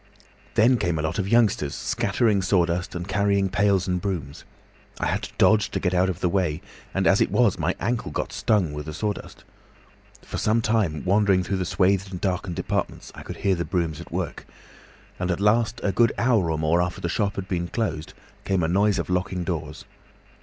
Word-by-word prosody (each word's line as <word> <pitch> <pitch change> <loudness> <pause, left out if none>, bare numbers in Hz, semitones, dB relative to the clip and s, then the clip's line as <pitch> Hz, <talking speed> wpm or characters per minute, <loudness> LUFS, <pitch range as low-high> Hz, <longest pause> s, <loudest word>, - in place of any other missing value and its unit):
Then 120 +3 +5
came 85 -2 0
a 75 - -2
lot 80 +4 -2
of 95 - -1
youngsters 105 -11 +2
scattering 105 -4 +1
sawdust 90 -2 0
and 90 +1 -4
carrying 100 -1 +1
pails 100 -2 +2
and 90 -1 -1
brooms. 85 -9 -4 0.5
I - - -1
had - - 0
to - - -8
dodge 105 -1 +4
to - - -2
get 90 -1 0
out 90 +1 +3
of 90 - -4
the - - +2
way, 85 -4 0 0.3
and 95 0 -1
as 95 +1 +4
it - - +3
was, 120 -6 +2
my - - 0
ankle 120 0 -1
got - - -4
stung 95 -9 +1
with 75 +1 -6
the 75 - -5
sawdust. 105 +3 -4 0.8
For - - -5
some 110 +2 +2
time, 105 -9 0
wandering 95 -1 +3
through 95 +2 -2
the 95 - -1
swathed 95 +2 +1
and 90 -2 -6
darkened 90 -2 -2
departments, - - -3
I - - -10
could - - -8
hear 100 - +4
the 85 -2 -1
brooms 85 -5 -2
at - - -12
work. - - -4 0.7
And 90 0 -2
at 90 - 0
last 110 +2 +2
a 100 - +1
good 115 +4 +3
hour 115 -8 +2
or 80 - 0
more 80 +3 +2
after 90 +1 -2
the - - -3
shop 100 +3 -1
had 95 -1 -5
been 85 -2 -2
closed, 85 -8 -3 0.3
came 95 -3 0
a - - +2
noise 100 +4 +2
of - - -2
locking 90 0 -1
doors. 80 -3 -5
95 Hz, 210 wpm, -24 LUFS, 85-105 Hz, 0.8 s, Then